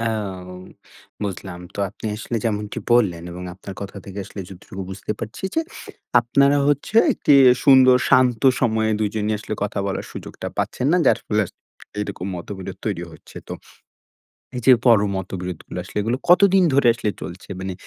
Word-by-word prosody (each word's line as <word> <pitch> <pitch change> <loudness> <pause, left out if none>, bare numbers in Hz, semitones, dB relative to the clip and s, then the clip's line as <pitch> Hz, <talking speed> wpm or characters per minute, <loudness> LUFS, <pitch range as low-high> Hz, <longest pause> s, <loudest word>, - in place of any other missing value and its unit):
এও 100 -5 -3 0.7
বুঝলাম। 95 -2 -5
তো - - -11
আপনি 100 +3 -9
আসলে 115 +2 -4
যেমনটি 105 -2 -2
বললেন 95 -9 +3
এবং 90 +1 -8
আপনার 95 +1 -9
কথা 100 0 -7
থেকে 100 0 -8
আসলে 100 - -8
যতটুকু 95 +1 -9
বুঝতে 95 +2 -4
পারছি 110 - -7
যে, 325 - +2 0.6
আপনারা 140 +4 +3
হচ্ছে 145 +9 0 0.2
একটি 150 - +1 0.3
সুন্দর 130 -2 +7
শান্ত 125 -2 +4 0.2
সময়ে 110 -3 +1
২ 105 - +1
জনই 110 0 -1
আসলে 110 +1 -5
কথা 105 - -2
বলার 95 - -3
সুযোগটা - - -8
পাচ্ছেন 125 - -1
না। - - +5
যার - - +5
ফলে 105 0 +1
আসলে - - -19 0.4
এইরকম 100 -3 -4
মত-বিরোধ 95 +2 -7
তৈরি - - -2
হচ্ছে। - - -16
তো - - -5 1.0
এই 125 - -3
যে 130 - +8
পর 120 -3 +7 0.2
মত-বিরোধগুলো 90 -2 -5
আসলে 90 - -8
এগুলো 115 +5 -1
কতদিন 190 +1 +6
ধরে 135 -3 +4
আসলে 115 -2 -2
চলছে? 90 +3 -8
মানে 95 0 -4
105 Hz, 165 wpm, -22 LUFS, 95-120 Hz, 1.0 s, যে